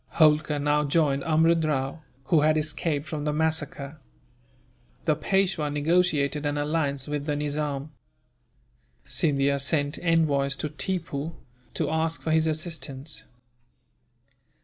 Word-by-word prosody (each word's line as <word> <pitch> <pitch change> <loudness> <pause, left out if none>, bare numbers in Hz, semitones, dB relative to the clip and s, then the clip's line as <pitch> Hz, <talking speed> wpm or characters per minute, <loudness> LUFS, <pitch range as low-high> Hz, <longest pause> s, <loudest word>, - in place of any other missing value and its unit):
Holkar 155 -1 +4
now 145 +1 +2
joined 140 -2 +2
Amrud 165 +1 +3
Rao, 145 0 -1 0.2
who 155 +3 +3
had 155 +1 +4
escaped 155 0 -1
from 155 -2 -4
the 150 - 0
massacre. 155 -1 -2 1.1
The 155 - +3
Peishwa 180 -1 +1
negotiated 150 -2 +1
an 145 0 -1
alliance 145 -2 -1
with 145 0 -3
the 150 - 0
Nizam. 145 0 -2 1.1
Scindia 140 -2 +1
sent 145 +1 0
envoys 150 -5 +2
to 150 - -4
Tippoo, 160 -1 -3 0.4
to 155 -2 -1
ask 160 +1 0
for 160 - -1
his 160 0 +3
assistance. 155 -3 -4
150 Hz, 120 wpm, -26 LUFS, 145-160 Hz, 1.1 s, Holkar